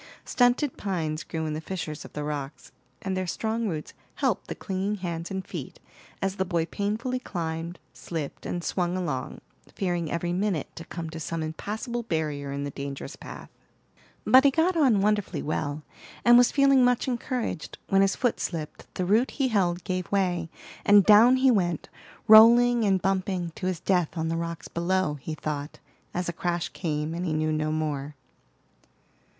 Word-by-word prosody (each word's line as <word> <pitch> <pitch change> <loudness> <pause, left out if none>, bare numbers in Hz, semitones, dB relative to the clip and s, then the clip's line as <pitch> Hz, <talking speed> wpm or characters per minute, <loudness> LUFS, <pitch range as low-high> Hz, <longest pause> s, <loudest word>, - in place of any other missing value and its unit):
Stunted 245 +2 +2
pines 160 -6 -2
grew 160 -1 -4
in 155 - -2
the 155 - -4
fissures 160 -3 -5
of - - -12
the 150 - -4
rocks, 145 -1 -5 0.3
and 190 -1 -2
their 185 -1 -2
strong 220 +5 -1
roots 155 -5 -4 0.2
helped - - 0
the - - -5
clinging 195 +1 -2
hands 170 -3 -4
and 190 -1 -4
feet - - -7 0.4
as 195 0 -1
the 190 - +1
boy 170 -3 0
painfully 220 +8 -2
climbed, 165 -4 -4 0.2
slipped, 160 -4 -6
and 175 -1 -3
swung 180 0 -1
along, 150 -8 -3 0.3
fearing 175 -4 -1
every 175 +1 -1
minute 185 -4 -1
to 165 - -8
come 165 -2 -6
to 165 - -6
some 165 +1 -3
impassable 215 +9 -4
barrier 155 -9 -2
in 140 0 -3
the 145 - -4
dangerous 140 +1 -6
path. - - -10 0.7
But 260 +1 +7
he 280 - +7
got 330 +6 +2
on 260 -11 +4
wonderfully 210 -1 0
well, 150 0 -2 0.4
and 240 0 +8
was 245 0 +6
feeling 275 -2 +5
much 245 +2 +2
encouraged, 245 -7 -3
when 195 0 +4
his 195 0 +3
foot 245 -2 0
slipped, 160 -4 -5
the 185 - -1
root 220 +7 +3
he 270 -3 0
held 180 -5 +1
gave 185 -1 -3
way, 180 -4 0 0.3
and 205 -2 +6
down 225 +4 +8
he 260 0 +4
went, 175 -7 0 0.4
rolling 235 +2 +8
and 195 -2 +3
bumping 185 -2 -1
to 185 - -4
his 185 -3 -1
death 180 -2 0
on 160 0 -1
the 165 - -1
rocks 170 0 -4
below, 170 -3 0
he 155 +4 -5
thought, 150 -1 -4 0.3
as 180 0 -2
a 170 - -2
crash 175 -1 -2
came, 155 -2 -3
and 170 +2 -3
he 165 -3 -1
knew 155 0 0
no 155 0 0
more. 150 -2 -2
180 Hz, 180 wpm, -27 LUFS, 160-210 Hz, 0.7 s, and